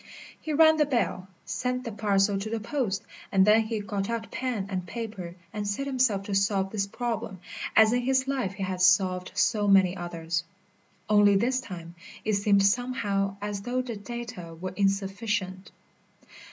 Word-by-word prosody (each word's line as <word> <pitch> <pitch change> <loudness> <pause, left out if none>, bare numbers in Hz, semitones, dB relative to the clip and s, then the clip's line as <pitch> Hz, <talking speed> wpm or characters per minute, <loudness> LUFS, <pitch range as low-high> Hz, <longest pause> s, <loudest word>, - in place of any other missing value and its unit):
He 315 - -4
rang 315 +1 +6
the 300 - +4
bell, 235 -8 -1 0.2
sent 250 0 -2
the 230 - -5
parcel 200 -1 +1
to 210 +2 -4
the 225 0 -2
post, 220 -4 -2 0.3
and 190 -1 +5
then 215 +2 +6
he 220 0 -2
got 200 0 -3
out 225 -2 -3
pen 250 -7 -2
and 185 -2 -3
paper 200 -5 -6 0.2
and 210 -1 -3
set 205 +7 -2
himself 255 -7 +1
to 200 - -5
solve 195 -1 +1
this 200 -2 -1
problem, 225 -4 -4 0.4
as 220 +1 +6
in 245 - +2
his 260 +1 +1
life 260 -8 -1
he 195 0 -5
had 185 -1 -3
solved 185 0 +3
so 210 -3 +2
many 190 -2 +5
others. 170 -2 -3 0.6
Only 205 -1 +5
this 255 +6 +1
time 170 -7 -9 0.3
it 215 - +1
seemed 200 0 +3
somehow 200 -4 0
as 205 -1 -3
though 250 +4 -1
the 240 -3 -5
data 205 -7 -7
were 185 +1 -5
insufficient. 195 0 -1
205 Hz, 170 wpm, -27 LUFS, 195-235 Hz, 0.6 s, rang